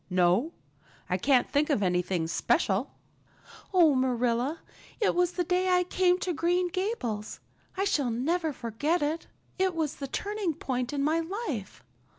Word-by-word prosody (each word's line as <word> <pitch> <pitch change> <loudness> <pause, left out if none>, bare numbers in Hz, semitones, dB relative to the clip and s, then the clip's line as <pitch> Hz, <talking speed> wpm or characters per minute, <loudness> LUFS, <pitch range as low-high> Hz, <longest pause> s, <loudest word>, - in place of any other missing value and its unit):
"No, 185 - +2 0.6
I - - +2
can't 270 -3 +3
think 295 +1 +1
of 250 -9 +2
anything 180 -2 0
special." 195 +7 +1 0.8
"Oh, 345 -6 +5
Marilla, 250 +2 0 0.4
it 430 - +2
was 355 0 +1
the 355 - 0
day 365 +2 +1
I 360 0 +4
came 360 0 +2
to 360 - -1
Green 355 +3 +1
Gables. 285 - -3 0.4
I 390 - +1
shall 300 -11 +1
never 315 +8 0
forget 285 +7 -1
it. 310 +3 -2 0.3
It 375 -2 +1
was 315 -3 -2
the 275 - -5
turning 400 +1 -2
point 255 -2 -2
in 285 -1 -1
my 315 +3 +2
life. 330 - -5
300 Hz, 155 wpm, -28 LUFS, 245-360 Hz, 0.8 s, Oh